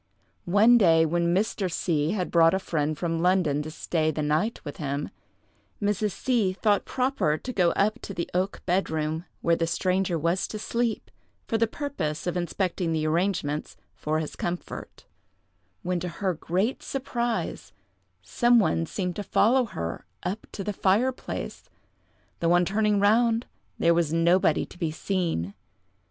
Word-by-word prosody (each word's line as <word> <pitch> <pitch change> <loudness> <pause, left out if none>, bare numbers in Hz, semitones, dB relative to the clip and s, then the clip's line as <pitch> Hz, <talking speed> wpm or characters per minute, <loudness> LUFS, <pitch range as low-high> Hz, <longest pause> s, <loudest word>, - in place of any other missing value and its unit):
One 220 +6 +6
day, 165 -5 +5
when 170 +2 +1
Mr. 195 0 0
C—— 160 0 0
had 185 -4 -2
brought 165 +1 +5
a - - +2
friend 155 -5 -1
from 165 0 -1
London 175 -5 +2
to 155 - -6
stay 155 0 -1
the 155 -1 -2
night 155 +10 0
with 145 - -6
him, 140 -1 -3 0.7
Mrs. 205 -1 0
C—— 220 -4 +1
thought 205 0 +1
proper 255 - 0
to 255 +9 -6
go 180 -5 +3
up 210 +2 +1
to - - -7
the 170 - -2
oak 185 +2 -1
bed 185 +2 +1
room, 160 +1 -2 0.2
where 170 - +3
the 165 0 -1
stranger 185 0 0
was 170 +4 0
to 215 - -6
sleep, 230 +1 -2 0.4
for 225 - 0
the 230 - +3
purpose 215 - -4
of 175 - -1
inspecting 175 -1 -1
the 155 -1 0
arrangements 155 -3 -1 0.2
for 155 +1 -2
his 155 -1 -4
comfort, 175 0 -5 0.8
when, 180 -1 -1
to 180 - -4
her 185 +2 -1
great 185 - -1
surprise, 240 -3 -3 0.5
some 240 -1 +3
one 165 -5 +2
seemed 180 -1 -3
to 205 - -3
follow 245 +6 +3
her 85 - -5 0.2
up 200 +4 -4
to 195 - -4
the 210 - -2
fireplace, 220 +8 -1 0.7
though, 170 0 +3
on 175 0 +4
turning 210 +1 +2
round, 230 +3 +3 0.3
there 170 - +4
was 165 -3 +1
nobody 170 +3 +3
to - - -16
be 165 - 0
seen. 160 - -2
180 Hz, 160 wpm, -26 LUFS, 165-210 Hz, 0.8 s, One